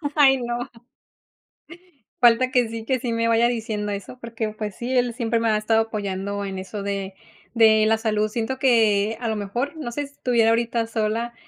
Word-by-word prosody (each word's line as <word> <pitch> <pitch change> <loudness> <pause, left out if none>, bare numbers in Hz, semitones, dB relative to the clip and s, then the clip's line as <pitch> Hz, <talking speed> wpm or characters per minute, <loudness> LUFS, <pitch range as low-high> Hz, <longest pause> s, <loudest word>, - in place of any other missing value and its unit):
Ay, 275 -3 +6
no. 240 -1 -4 1.5
Falta 240 +2 +5
que 250 -3 +2
sí 225 0 -6
que 260 +2 0
sí 240 -1 -3
me 230 0 0
vaya 230 +1 +4
diciendo 215 -3 -3
eso 200 +5 -6
porque 230 -2 -4
pues 215 -1 -6
sí, 250 +2 -3
él 245 -1 +1
siempre 230 -1 -1
me 230 0 +1
ha 215 - +2
estado 220 +1 +2
apoyando 200 -2 -3
en 195 -1 -5
eso 200 +2 -6
de 195 -1 -3 0.4
de 220 -2 +5
la 220 +1 +3
salud. 215 -1 0
Siento 230 +4 -3
que 220 -4 +3
a 235 - -3
lo 220 - -1
mejor 225 +9 -3
no 285 -6 -5
sé 290 +4 -4
si 280 - -22
estuviera 235 -5 +2
ahorita 230 0 0
sola, 225 +1 -2
225 Hz, 195 wpm, -23 LUFS, 215-240 Hz, 1.5 s, Ay